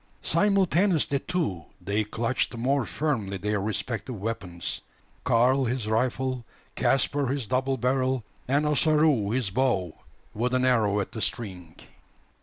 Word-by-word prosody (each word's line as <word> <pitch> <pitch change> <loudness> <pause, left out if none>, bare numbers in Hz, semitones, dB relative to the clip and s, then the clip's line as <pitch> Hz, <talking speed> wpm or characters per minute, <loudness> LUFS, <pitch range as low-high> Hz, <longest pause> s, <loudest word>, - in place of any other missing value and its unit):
Simultaneously, 190 -7 +2
too, 155 - -2 0.2
they 105 +2 0
clutched 115 +3 -1
more 130 +1 +1
firmly 110 -11 -1
their 105 +1 -1
respective 110 +2 -3
weapons 95 -5 -4 0.4
Karl 130 +3 +3
his 120 -1 -1
rifle, 130 +3 0 0.3
Caspar 135 +1 +1
his 135 -1 -1
double 130 +3 0
barrel, 130 0 +1 0.2
and 140 +4 +2
Ossaroo 150 -6 +3
his 115 -3 0
bow, 100 -8 +1 0.4
with 125 +4 0
an 130 0 +2
arrow 110 -5 +3
at 95 - -5
the 110 - -6
string. 90 -9 -4
125 Hz, 125 wpm, -27 LUFS, 105-135 Hz, 0.4 s, Karl